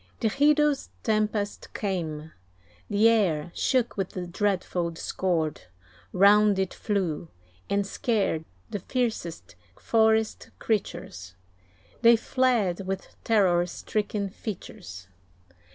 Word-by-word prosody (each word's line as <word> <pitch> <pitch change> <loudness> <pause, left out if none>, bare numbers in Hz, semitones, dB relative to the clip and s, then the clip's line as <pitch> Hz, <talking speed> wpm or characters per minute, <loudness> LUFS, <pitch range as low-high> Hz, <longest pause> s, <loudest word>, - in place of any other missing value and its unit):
The 225 - +2
hideous 295 +2 +3
tempest 215 -2 -1
came; 160 -6 -3 0.6
the 210 +2 +4
air 175 -8 +2
Shook 250 -4 0
with 195 -2 -1
the 180 -1 -4
dreadful 180 -2 -1
discord; 165 -1 -2 0.5
round 205 +1 +5
It 190 -1 -1
flew, 185 -7 -2 0.4
and 200 0 +1
scared 195 -6 0 0.3
the 205 - -2
fiercest 195 - -3 0.2
forest 220 -1 +2
creatures; 130 - -3 0.7
They 235 0 +7
fled 225 -7 +1
with 195 0 -5
terror 180 -6 +3
stricken 205 +1 -3
features. 90 - -8
200 Hz, 100 wpm, -27 LUFS, 175-220 Hz, 0.7 s, They